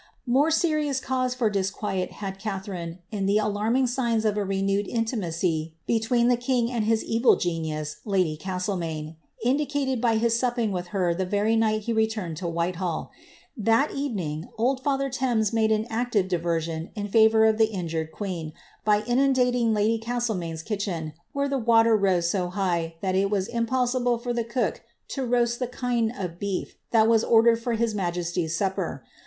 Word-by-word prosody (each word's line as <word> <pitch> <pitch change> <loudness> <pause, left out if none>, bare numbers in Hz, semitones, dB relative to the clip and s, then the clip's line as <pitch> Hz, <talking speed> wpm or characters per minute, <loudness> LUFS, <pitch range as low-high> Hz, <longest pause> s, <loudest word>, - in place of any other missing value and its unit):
More 270 +5 +3
serious 305 -4 +1
cause 255 -1 -1
for 245 -3 +1
disquiet 195 -1 -2
had 195 -1 -6
Catharine 190 -5 -5
in 200 -3 -1
the 200 +1 +3
alarming 215 +5 +1
sigm 240 -2 0
of 210 -1 +2
a 210 - 0
renewed 195 +1 0
intimacy 170 -8 -1
between 235 +1 +2
the 245 - +4
king 245 -1 +1
and 230 -4 -1
his 225 0 +2
evil 230 +2 +4
genius, 155 -3 -3
lady 185 -7 +1
Castle 185 +3 -3
maine, 160 -2 -5 0.3
indicated 270 -1 0
by 235 -2 +3
his 230 +1 +2
supping 240 -3 0
with 180 -1 -3
her 180 -2 0
the 190 +3 -1
very 205 +3 +1
night 215 -1 +2
he 230 +2 -2
returned 220 -7 -1
to 175 +1 -3
Whitehall. 170 0 -2 0.4
That 225 +5 +2
evening 185 - -3
old 255 +4 +1
father 275 0 0
Thames 245 -5 0
made 220 -1 +2
an 215 0 +1
active 230 -4 0
diversion 165 -2 -2
in 205 -1 -3
favour 220 +1 +5
of 220 0 +3
the 220 -1 +4
injured 165 -5 -3
queen, 170 -5 -5 0.3
by 210 0 +3
inundating 250 -2 +2
my 210 -1 +1
lady 225 +2 +2
Castlemaine^ 220 -9 -3
kitchen, 190 -7 -3 0.2
where 280 0 0
the 275 -1 -1
water 230 -1 +5
rose 190 -4 +2
so 180 0 0
high 175 -4 -1
that 190 -1 0
it 195 +1 +2
was 195 -2 0
impossible 245 +1 0
for 240 +1 -3
the 235 -1 0
cook 235 +2 -2 0.3
to 270 - -3
roast 240 -1 +1
the 250 - -1
chine 245 -2 0
of 180 -7 -6
beef 200 -2 -3 0.2
that 220 -1 +4
was 225 -1 +4
ordered 230 0 +4
for 235 0 -1
his 230 -1 0
majesty^ 175 -3 -2
supper. 185 - -2
215 Hz, 175 wpm, -26 LUFS, 185-240 Hz, 0.4 s, favour